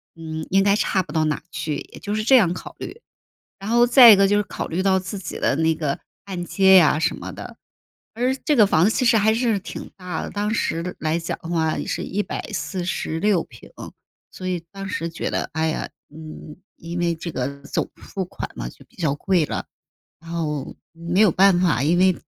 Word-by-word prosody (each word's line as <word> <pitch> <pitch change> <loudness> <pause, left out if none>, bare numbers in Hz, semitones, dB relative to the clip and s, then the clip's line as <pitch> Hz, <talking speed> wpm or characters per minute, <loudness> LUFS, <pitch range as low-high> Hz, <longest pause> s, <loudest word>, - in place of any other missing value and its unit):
嗯 160 -1 -6
应 195 +1 +3
该 200 0 +4
差 190 -3 +1
不 - - -12
到 160 -1 +2
哪 155 -1 -1
去， 155 -2 -3 0.2
也 - - -10
就 205 +1 -3
是 215 - -1
这 260 +3 +6
样 180 -6 +3
考 - - -9
虑。 465 - -8 0.6
然 200 +3 -6
后 240 +1 +5
再 245 -1 +9
一 - - +7
个 195 0 +5
就 205 - +3
是 205 - +2
考 - - -5
虑 180 +3 -1
到 190 -1 +3
自 190 +2 -6
己 180 - -6
的 135 - +1
那 160 0 +2
个 150 -3 -2 0.3
按 185 -3 -5
揭 190 +1 +4
呀 155 -3 +5
什 - - 0
么 - - -7
的。 - - -9 0.6
而 250 +3 +1
这 300 - +2
个 215 - +7
房 170 -3 +3
子 215 - +4
其 255 - 0
实 230 -1 +5
还 220 +1 +4
是 230 -3 +1
挺 - - -8
大 180 -3 -5
的， - - -5
当 210 +1 -2
时 180 -5 -2
来 155 +2 0
讲 165 - -4
的 165 - -8
话 160 -2 0
也 - - -4
是 - - -3
146平。 185 - -3 0.6
所 185 - -8
以 175 -2 -2
当 195 -1 -6
时 170 -3 -3
觉 165 - -4
得， - - -2
哎 160 0 +1
呀， 155 - -3 0.2
嗯， 155 -1 -10 0.2
因 170 +1 -6
为 170 -1 +1
这 165 +1 -6
个 140 +2 -3
总 - - -2
付 190 -2 -5
款 - - -7
嘛， - - -4
就 - - -16
比 - - -27
较 155 -6 0
贵 170 0 +1
了。 - - -4 0.5
然 165 +1 -11
后 150 -5 -3 0.2
没 170 +3 -2
有 205 -6 +6
办 190 0 +4
法， 155 -7 +2
因 165 +4 +2
为 185 -1 +4
180 Hz, 235 characters per minute, -22 LUFS, 160-200 Hz, 0.6 s, 再